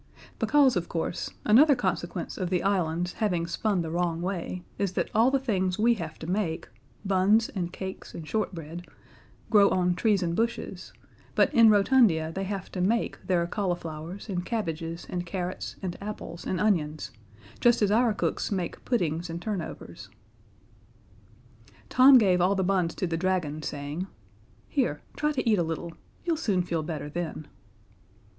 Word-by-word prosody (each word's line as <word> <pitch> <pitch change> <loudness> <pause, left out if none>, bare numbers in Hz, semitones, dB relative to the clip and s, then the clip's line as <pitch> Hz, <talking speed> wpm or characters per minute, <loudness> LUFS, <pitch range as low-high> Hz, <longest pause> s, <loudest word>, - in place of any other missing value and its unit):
Because, 285 -3 +4
of 175 -2 -2
course, 165 0 -2 0.2
another 275 +7 +6
consequence 185 -6 -2
of 185 -2 -3
the 180 -1 0
island's 180 -3 0
having 180 -6 0
spun 185 +1 0
the 160 - -5
wrong 170 -1 0
way 180 0 -3 0.2
is 195 -2 0
that - - -1
all 225 +4 +5
the 275 - +2
things 190 -8 0
we 235 +2 +4
have 165 -8 -6
to - - -8
make 175 -2 -2 0.4
buns 200 +4 +3
and 175 -3 -3
cakes 190 +1 -7
and 160 - -7
shortbread 175 -5 -4 0.6
grow 205 -2 +6
on 180 -1 +2
trees 200 +1 +2
and 170 -1 -1
bushes, 230 +3 -2 0.4
but - - +3
in 230 -4 +7
Rotundia 200 -6 +4
they 195 +2 -3
have 195 -1 -5
to 180 - -3
make 225 +6 0
their 175 -3 +2
cauliflowers 175 -2 -4
and 180 -4 -2
cabbages 170 -6 -3
and 175 -1 -3
carrots 180 0 -4
and 180 -2 -3
apples 200 -4 -7
and 185 - -1
onions, 155 -7 0 0.5
just 240 -2 +4
as 200 - +3
our 235 +2 +4
cooks 210 - -2
make 185 -4 -3
puddings 170 -7 -1
and 165 +1 -4
turnovers. 195 -2 -6 1.8
Tom 260 +1 +8
gave 185 -6 +4
all 185 +3 +3
the 190 - +1
buns 180 -3 +1
to - - -1
the 165 -2 -1
dragon, 165 -4 -1
saying: 145 +5 -4 0.6
"Here, 250 - 0
try 300 0 +1
to 265 -5 -2
eat 215 -4 +4
a - - +3
little. 165 +1 -4 0.3
You'll 335 -2 +1
soon 195 - +1
feel 170 -2 -2
better 155 -2 -5
then." 155 -1 -5
185 Hz, 165 wpm, -27 LUFS, 170-210 Hz, 1.8 s, Tom